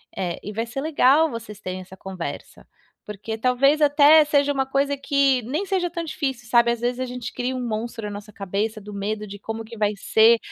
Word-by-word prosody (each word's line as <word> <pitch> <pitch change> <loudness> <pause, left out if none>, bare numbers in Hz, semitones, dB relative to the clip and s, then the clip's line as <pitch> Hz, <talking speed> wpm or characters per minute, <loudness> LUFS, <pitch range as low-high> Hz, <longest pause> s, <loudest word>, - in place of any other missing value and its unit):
eh, 175 -3 -3
e 210 - -7
vai 225 +2 -2
ser 240 +3 -6
legal 310 0 +4
vocês 230 -3 -8
terem 185 -1 -5
essa 190 +1 -13
conversa. 185 -3 -7 0.4
Porque 210 +2 -6
talvez 270 +5 +3
até 295 +1 +7
seja 285 -1 +2
uma 270 -1 -1
coisa 275 +1 +1
que 275 -2 +2
nem 290 - -3
seja 375 -3 0
tão 340 0 -4
difícil, 265 -7 -4
sabe, 235 0 +4
ás 235 - -2
vezes 245 +1 -1
a 255 - -1
gente 250 -1 -6
cria 255 +1 -2
um 250 -1 -3
monstro 225 +1 -4
na 205 - -4
nossa 205 +1 -9
cabeça 205 +3 -3
do 210 0 -10
medo 210 +2 -3
de 200 0 -9
como 225 +2 -5
que 230 +1 -11
vai 210 0 +2
ser 225 +3 +5
235 Hz, 215 wpm, -23 LUFS, 210-280 Hz, 0.4 s, até